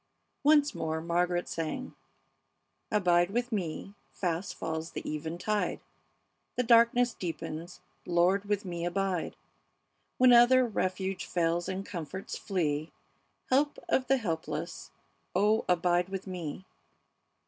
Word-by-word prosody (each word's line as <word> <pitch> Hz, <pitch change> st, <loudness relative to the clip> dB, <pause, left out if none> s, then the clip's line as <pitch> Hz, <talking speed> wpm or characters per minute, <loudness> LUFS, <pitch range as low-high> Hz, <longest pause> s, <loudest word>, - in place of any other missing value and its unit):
Once 295 Hz, 0 st, +5 dB
more 160 Hz, 0 st, -2 dB
Margaret 175 Hz, +1 st, 0 dB
sang: 165 Hz, +11 st, -4 dB, 1.0 s
"Abide 175 Hz, -4 st, +3 dB
with 240 Hz, +4 st, -1 dB
me; 195 Hz, -1 st, -3 dB, 0.2 s
fast 180 Hz, +1 st, -2 dB
falls 160 Hz, 0 st, -4 dB
the -, -, -5 dB
eventide; 170 Hz, +7 st, -2 dB, 0.8 s
The 250 Hz, -, +1 dB
darkness 235 Hz, +1 st, +5 dB
deepens; 165 Hz, 0 st, -6 dB, 0.3 s
Lord, 180 Hz, +3 st, +3 dB
with 205 Hz, -1 st, -1 dB
me 170 Hz, -2 st, -4 dB
abide! 185 Hz, 0 st, -1 dB, 0.8 s
When 255 Hz, -1 st, +7 dB
other 245 Hz, +2 st, +7 dB
refuge 190 Hz, -3 st, -2 dB
fails 170 Hz, +1 st, 0 dB
and 190 Hz, +1 st, -3 dB
comforts 180 Hz, +1 st, -6 dB
flee, 155 Hz, -6 st, -1 dB, 0.6 s
Help 285 Hz, +3 st, +3 dB
of 260 Hz, -1 st, +2 dB
the 270 Hz, -, +4 dB
helpless, 165 Hz, -, -4 dB, 0.5 s
oh, 215 Hz, +2 st, +3 dB
abide 175 Hz, 0 st, +2 dB
with 195 Hz, -1 st, -5 dB
me!" 180 Hz, -2 st, -6 dB
185 Hz, 115 wpm, -30 LUFS, 170-215 Hz, 1.0 s, When